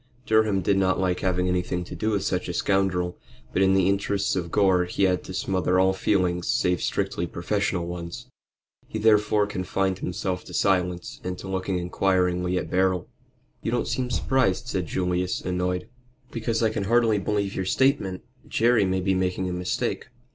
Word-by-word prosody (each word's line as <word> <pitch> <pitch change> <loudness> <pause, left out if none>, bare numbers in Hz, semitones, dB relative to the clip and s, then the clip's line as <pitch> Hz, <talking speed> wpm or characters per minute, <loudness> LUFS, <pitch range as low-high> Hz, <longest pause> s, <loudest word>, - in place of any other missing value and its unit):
Durham 110 -3 +3
did 100 +1 +2
not 95 -1 +2
like 90 -1 0
having 90 -1 0
anything 90 0 -1
to - - -10
do 110 - -1
with 100 -3 0
such 90 -1 -1
a 90 - -3
scoundrel, 90 -3 0 0.3
but 95 - +1
in 95 0 +4
the 95 -1 +3
interests 100 0 0
of 85 -2 -2
Gore 95 -2 +3
he 90 +2 -2
had 90 -1 +2
to - - -7
smother 95 -1 +1
all 95 0 +4
feelings 90 -3 0
save 90 -1 +1
strictly 85 - -1
professional 90 +1 -1
ones. 85 +7 -6 0.6
He - - -5
therefore 105 -1 +3
confined 95 -1 -1
himself 90 0 -3
to - - -8
silence, 90 -2 0
and 90 0 -4
to - - -8
looking 95 0 -2
inquiringly 90 0 +1
at - - -4
Beryl. 95 -1 +1 0.5
"You - - -2
don't 120 +1 0
seem 125 -1 -1
surprised," 125 -4 +1
said 95 -8 -2
Julius, 90 +1 -1
annoyed. 90 0 -2 0.4
"Because 115 0 -1
I 110 - +3
can 100 - -2
hardy 115 -1 +3
believe 100 0 -1
your 95 - -2
statement. 95 -5 +1 0.2
Jerry 115 -2 +3
may 95 0 0
be 95 +1 +1
making 95 0 0
a - - -3
mistake." 90 0 -2
95 Hz, 175 wpm, -25 LUFS, 90-100 Hz, 0.6 s, in